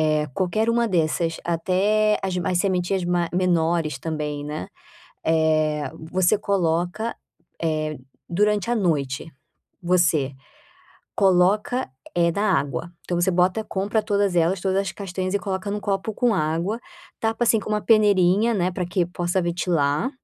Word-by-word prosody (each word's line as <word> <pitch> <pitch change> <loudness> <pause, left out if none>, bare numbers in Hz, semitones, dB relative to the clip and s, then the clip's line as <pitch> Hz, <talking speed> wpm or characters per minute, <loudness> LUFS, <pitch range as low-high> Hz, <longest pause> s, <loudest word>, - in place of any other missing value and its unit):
Eh, 155 -1 +2
qualquer 215 +5 +1
uma 235 0 +2
dessas, 165 -2 0
até 195 +5 +2
as 190 -1 -2
mai 180 - -1
as 180 - +1
sementinhas 185 0 0
ma 175 -1 0
menores 170 -5 +1
também, 150 -1 -4
né, 150 -10 -5 0.6
eh, 155 -2 +2 0.2
você 185 +3 +3
coloca, 185 +2 -1 0.5
eh, 155 -2 -1 0.3
durante 210 +3 +1
a 240 - +2
noite, 150 - 0 0.6
você 170 -6 +2 0.8
coloca, 200 +6 +2 0.3
eh, 170 -1 +3
na 200 +1 +2
água, 145 +4 -4
então 175 -1 -2
você 175 - +3
bota 185 +4 +1
compra 205 +3 -1
todas 200 -3 +1
elas, 170 +3 +2
todas 190 +1 0
as 195 -2 -3
castanhas 185 -1 -4
e - - +3
coloca 195 0 -3
num 205 +1 -2
copo 200 +1 -2
com 240 -1 +2
água, 170 +6 -1 0.4
tapa, 225 +1 0
assim, 230 -1 +4
com 210 - -8
uma 210 0 +1
peneirinha, 205 0 +4
né, 180 -3 +1
pra 180 0 -3
que 175 -1 0
possa 175 +1 -1
ventilar 170 - 0
180 Hz, 150 wpm, -23 LUFS, 165-205 Hz, 0.8 s, assim